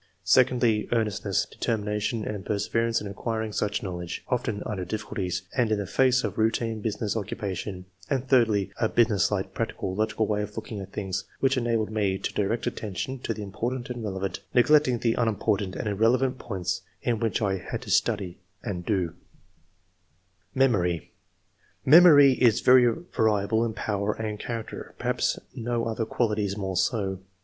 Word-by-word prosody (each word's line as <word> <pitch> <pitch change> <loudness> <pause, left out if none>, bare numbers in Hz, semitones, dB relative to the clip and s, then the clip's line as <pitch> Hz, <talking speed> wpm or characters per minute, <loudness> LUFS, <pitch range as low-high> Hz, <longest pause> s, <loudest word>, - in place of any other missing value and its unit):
Secondly, 120 -4 +3
earnestness, 105 -4 0
determination, 105 0 -2
and 105 -2 -4
perseverance 115 +3 0
in 105 - -5
acquiring 110 +2 -3
such 105 +4 -1
knowledge, 90 -3 -5
often 115 -5 -1
under 105 -5 -3
difficulties, 95 -2 -3
and 120 -3 +2
in 110 - +2
the 100 - -3
face 130 +5 +3
of - - -3
routine 110 0 0
business 105 -1 -2
occupation; 95 -2 -4 0.2
and 135 -2 -1
thirdly, 110 -7 +3
a 110 -2 +2
business 110 -4 +3
like, - - -2
practical, 95 - -3
logical 110 +2 0
way 105 0 0
of 105 0 -6
looking 110 -5 -5
at 95 - -8
things, 95 -3 -3
which 135 0 +2
enabled 115 -3 0
me 100 -3 0
to 95 - -4
direct 105 +3 -1
attention 110 +6 -4
to 120 - -3
the 105 -2 -4
important 120 +6 -4
and 120 -2 -5
relevant, 95 -2 -3 0.2
neglecting 130 0 +5
the 115 0 +1
unim 115 -4 0
portant 100 -3 0
and - - -3
irrelevant 120 +6 +2
points 95 -5 -3 0.2
in 115 -2 0
what 115 -1 0
I 100 -3 0
had - - -6
to - - -6
study 100 -6 +1 0.2
and 95 -7 -4
do/' 90 -5 0 1.4
MEMORY. 95 - +1 0.7
Memory 145 -2 +8
is 120 -4 +5
very 125 -1 +6 0.2
variable 110 +1 +2
in 115 -2 -2
power 105 -1 -1
and 110 -1 -4
char 115 0 -3
acter, - - -10
perhaps - - 0 0.2
no 120 0 -2
other 115 0 -2
quality 105 -4 0
is 100 +1 -3
more 95 -2 -3
so. 95 0 0
110 Hz, 165 wpm, -26 LUFS, 100-120 Hz, 1.4 s, Memory